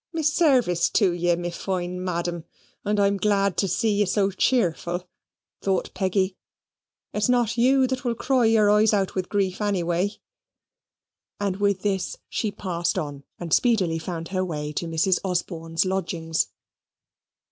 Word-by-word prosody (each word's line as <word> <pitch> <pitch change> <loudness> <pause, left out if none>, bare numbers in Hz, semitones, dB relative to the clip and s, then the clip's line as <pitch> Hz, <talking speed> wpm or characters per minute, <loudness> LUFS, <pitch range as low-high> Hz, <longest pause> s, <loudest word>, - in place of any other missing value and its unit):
"My 325 -1 -2
service 270 - +3
to 195 -5 +4
ye, 175 0 +1
me 175 0 -4
fine 180 0 -3
Madam, 175 -2 -3 0.4
and 210 0 0
I'm 200 0 +3
glad 200 -1 +1
to 195 - +2
see 205 +3 +1
ye 205 - +4
so 195 +1 +1
cheerful," 180 -5 0 0.5
thought 190 -1 -1
Peggy. 190 0 0 0.8
"It's 210 +3 0
not 240 -2 +2
YOU 260 +3 +4
that 255 -1 -2
will 240 -2 0
cry 255 0 +2
your 220 -2 +4
eyes 210 0 +4
out 195 -2 0
with 185 -1 -3
grief, 195 -1 -1
anyway." 180 -2 0 1.3
And 200 -2 -1
with 200 -2 +1
this 195 -3 -1
she 220 - -1
passed 175 -4 -2
on, 145 -2 -4
and 170 -3 -3
speedily 190 -10 +2
found 165 0 -5
her 185 -1 -1
way 150 -4 -4
to 170 - -3
Mrs. 165 +3 +2
Osborne's 170 -2 -1
lodgings. 170 -4 -1
190 Hz, 150 wpm, -24 LUFS, 175-210 Hz, 1.3 s, to